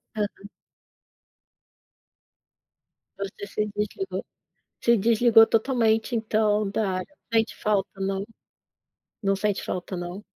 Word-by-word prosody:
Aham. 205 Hz, -1 st, -4 dB, 2.7 s
Você 200 Hz, +1 st, -6 dB
se 210 Hz, +1 st, -1 dB
desligou 210 Hz, -, -3 dB, 0.6 s
se 235 Hz, -1 st, +5 dB
desligou 225 Hz, +1 st, +6 dB
totalmente 225 Hz, -1 st, +2 dB
então 215 Hz, -2 st, +1 dB
da 200 Hz, -1 st, 0 dB
área. 290 Hz, +11 st, -9 dB, 0.2 s
Sente 225 Hz, 0 st, +2 dB
falta, 205 Hz, -2 st, -1 dB
não 195 Hz, 0 st, -1 dB, 1.0 s
Não 195 Hz, -1 st, +2 dB
sente 205 Hz, 0 st, -1 dB
falta, 185 Hz, +1 st, -4 dB
não? 175 Hz, +3 st, -6 dB
210 Hz, 100 wpm, -25 LUFS, 195-225 Hz, 2.7 s, desligou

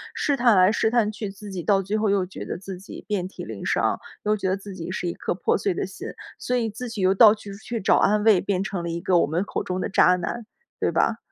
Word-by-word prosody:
试 285 Hz, -, +1 dB
探 240 Hz, -4 st, +4 dB
来、 185 Hz, +2 st, +6 dB
试 220 Hz, -, +1 dB
探 220 Hz, -2 st, +2 dB
去 210 Hz, -1 st, -5 dB
自 200 Hz, +1 st, -10 dB
己 185 Hz, -2 st, -4 dB
到 195 Hz, +1 st, +2 dB
最 210 Hz, +3 st, -1 dB
后 215 Hz, -2 st, +1 dB
又 195 Hz, -2 st, +2 dB
觉 185 Hz, -, -8 dB
得 -, -, -5 dB
自 190 Hz, 0 st, -8 dB
己 195 Hz, -, -11 dB
遍 195 Hz, -4 st, -1 dB
体 190 Hz, -, -9 dB
鳞 -, -, -7 dB
伤， -, -, +1 dB, 0.2 s
又 210 Hz, 0 st, +2 dB
觉 190 Hz, -2 st, -2 dB
得 190 Hz, -, 0 dB
自 200 Hz, 0 st, -9 dB
己 175 Hz, -2 st, -7 dB
是 185 Hz, -, -3 dB
一 170 Hz, -, -2 dB
颗 -, -, -3 dB
破 -, -, +1 dB
碎 195 Hz, -1 st, 0 dB
的 -, -, -2 dB
心， 190 Hz, -, -8 dB, 0.3 s
所 250 Hz, -, -1 dB
以 230 Hz, -, 0 dB
自 240 Hz, +4 st, -6 dB
己 225 Hz, -3 st, -5 dB
又 185 Hz, +1 st, +4 dB
到 215 Hz, +2 st, +7 dB
去 205 Hz, -1 st, -10 dB
处 200 Hz, -, -11 dB
去 235 Hz, +1 st, -4 dB
找 200 Hz, -, +3 dB
安 210 Hz, +1 st, +3 dB
慰， 215 Hz, -5 st, +5 dB
变 195 Hz, -1 st, -1 dB
成 195 Hz, -4 st, -3 dB
了 170 Hz, -, -3 dB
一 170 Hz, 0 st, -3 dB
个 175 Hz, 0 st, +2 dB
我 -, -, +2 dB
们 165 Hz, +6 st, 0 dB
口 -, -, -3 dB
中 185 Hz, 0 st, -3 dB
的 -, -, -1 dB
渣 180 Hz, -1 st, +5 dB
男， 215 Hz, +6 st, -4 dB, 0.3 s
对 -, -, +1 dB
吧？ -, -, +1 dB
195 Hz, 310 characters per minute, -24 LUFS, 185-215 Hz, 0.3 s, 到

